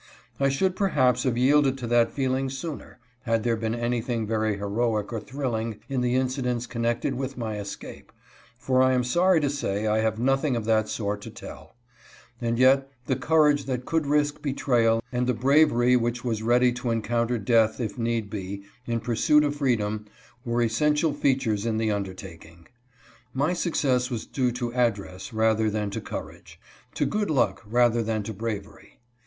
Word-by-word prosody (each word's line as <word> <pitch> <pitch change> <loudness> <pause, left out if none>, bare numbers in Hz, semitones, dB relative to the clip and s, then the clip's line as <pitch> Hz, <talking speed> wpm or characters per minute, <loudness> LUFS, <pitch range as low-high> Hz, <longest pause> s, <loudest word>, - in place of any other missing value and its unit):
I 140 0 +3
should 185 +7 0
perhaps 130 - +2
have 125 -2 +1
yielded 135 +1 +3
to 125 - -5
that 120 0 +3
feeling 130 0 -1
sooner, 140 +3 -7 0.2
had 115 -3 0
there 115 -1 +1
been 110 0 -2
anything 120 -1 -1
very 110 -1 0
heroic 105 +1 -1
or 115 - -2
thrilling 115 -3 -3
in 135 -2 -1
the 125 0 +1
incidents 125 -2 -1
connected 115 0 -1
with 135 +1 -4
my 110 -3 -3
escape, 100 -1 -8 0.5
for 130 0 +1
I 130 0 +4
am 125 -1 +2
sorry 175 +8 +3
to 145 - +1
say 110 -7 -2
I 110 0 +2
have 110 -1 0
nothing 135 +3 +1
of 115 -2 -3
that 110 -1 +2
sort 105 -2 -3
to - - -8
tell; 80 +8 -11 0.7
and 115 0 0
yet 135 +2 +4 0.2
the 130 - 0
courage 150 +1 +3
that 125 -2 -3
could 160 -3 0
risk 145 0 +1
betrayal 120 -5 +1
and 125 0 -1
the 125 - +1
bravery 125 -1 +4
which 120 0 -1
was 115 -3 -2
ready 120 +2 +3
to 125 0 -4
encounter 115 +1 0
death 110 +1 +2
if 115 -1 -4
need 115 -2 -1
be, 100 -1 -6 0.2
in 115 -1 -1
pursuit 125 +7 +3
of 145 0 -1
freedom, 110 -6 -1 0.4
were 120 0 0
essential 150 +7 +1
features 130 -7 0
in 115 -1 -1
the 110 -1 0
undertaking. 90 -4 -7 0.7
My 145 +6 +1
success 135 -8 0
was 120 -4 -4
due 125 -3 0
to 120 -1 -4
address 105 -7 -1
rather 110 0 +2
than 105 -1 -2
to - - -4
courage; - - -8 0.4
to - - +1
good 210 -1 -1
luck 140 -5 +1
rather 120 +1 +3
than 110 -1 -2
to 110 +2 -5
bravery. 105 -1 -6
120 Hz, 175 wpm, -26 LUFS, 110-135 Hz, 0.7 s, I